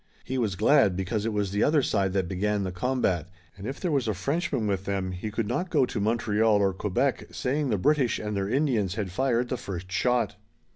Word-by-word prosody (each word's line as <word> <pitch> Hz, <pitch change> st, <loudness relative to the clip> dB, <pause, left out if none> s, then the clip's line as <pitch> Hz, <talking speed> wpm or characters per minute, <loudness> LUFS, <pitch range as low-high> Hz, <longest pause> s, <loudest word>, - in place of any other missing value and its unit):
He 130 Hz, 0 st, -3 dB
was 105 Hz, -5 st, 0 dB
glad, 110 Hz, -2 st, +4 dB
because 100 Hz, +4 st, -2 dB
it -, -, 0 dB
was 105 Hz, -2 st, -1 dB
the 100 Hz, +1 st, 0 dB
other 150 Hz, -2 st, +3 dB
side 95 Hz, -5 st, +1 dB
that 95 Hz, -3 st, 0 dB
began 100 Hz, +3 st, 0 dB
the 95 Hz, -, -3 dB
combat, 90 Hz, -, 0 dB, 0.3 s
and 100 Hz, +2 st, -7 dB
if 135 Hz, -, -5 dB
there 180 Hz, -, -1 dB
was 135 Hz, -5 st, +1 dB
a 110 Hz, -, 0 dB
Frenchman 140 Hz, -, -1 dB
with 100 Hz, -2 st, -1 dB
them 95 Hz, -2 st, -2 dB
he 90 Hz, +4 st, -5 dB
could 110 Hz, 0 st, -2 dB
not 180 Hz, -, -1 dB
go 145 Hz, -7 st, +3 dB
to 115 Hz, -, -4 dB
Montreal 110 Hz, 0 st, +2 dB
or 100 Hz, -1 st, +2 dB
Quebec, 105 Hz, +8 st, -1 dB
saying 140 Hz, +2 st, -1 dB
the 105 Hz, -, +1 dB
British 135 Hz, +2 st, +2 dB
and 105 Hz, -1 st, -4 dB
their 100 Hz, 0 st, -1 dB
Indians 120 Hz, -8 st, +1 dB
had 100 Hz, -5 st, -3 dB
fired 125 Hz, +3 st, +1 dB
the 130 Hz, -, -1 dB
first 95 Hz, -4 st, -6 dB
shot. 125 Hz, +4 st, +1 dB
105 Hz, 225 wpm, -27 LUFS, 95-130 Hz, 0.3 s, glad